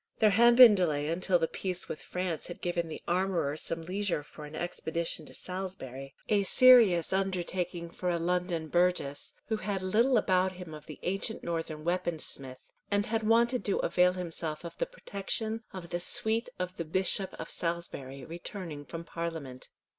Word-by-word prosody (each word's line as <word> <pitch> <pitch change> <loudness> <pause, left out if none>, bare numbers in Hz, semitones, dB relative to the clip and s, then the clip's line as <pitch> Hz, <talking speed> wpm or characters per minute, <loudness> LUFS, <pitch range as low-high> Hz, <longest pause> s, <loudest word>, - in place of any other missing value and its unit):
There 215 -2 +5
had 235 +4 +6
been 245 -3 +10
delay 155 -6 +1
until 180 +2 +2
the 165 -1 0
peace 185 0 -2
with 150 - -6
France 180 +1 -3
had 175 - -8
given 175 -1 -2
the 155 - -7
armourer 175 -5 0
some 165 +1 -3
leisure 185 -3 -1
for 150 +1 -11
an 150 +1 -9
expedition 165 -2 -1
to - - -9
Salisbury, 180 -8 -6
a 210 -2 +3
serious 210 -6 +6
undertaking 180 -2 -2
for 180 - -3
a 175 - +1
London 175 -1 -1
burgess, 175 -4 0 0.2
who 220 - +1
had 195 -2 -3
little 230 +7 +3
about 185 -2 +2
him 180 -3 -9
of 150 0 -10
the 155 - -8
ancient 195 +4 -1
northern 165 -2 -3
weapon 175 -1 0
smith, 130 -4 -5 0.3
and 205 0 +1
had 225 0 -1
wanted 235 +3 +3
to 200 - +1
avail 180 0 +3
himself 165 -3 -4
of 170 - -7
the - - 0
protection 220 - -3
of 180 -3 -8
the 175 - -1
suite 220 +6 +1
of 180 0 -4
the 170 - -3
Bishop 190 +3 +1
of - - -6
Salisbury, 155 -6 -3
returning 170 -2 -6
from 165 +2 -7
Parliament. 165 -7 -6
180 Hz, 175 wpm, -30 LUFS, 165-195 Hz, 0.3 s, been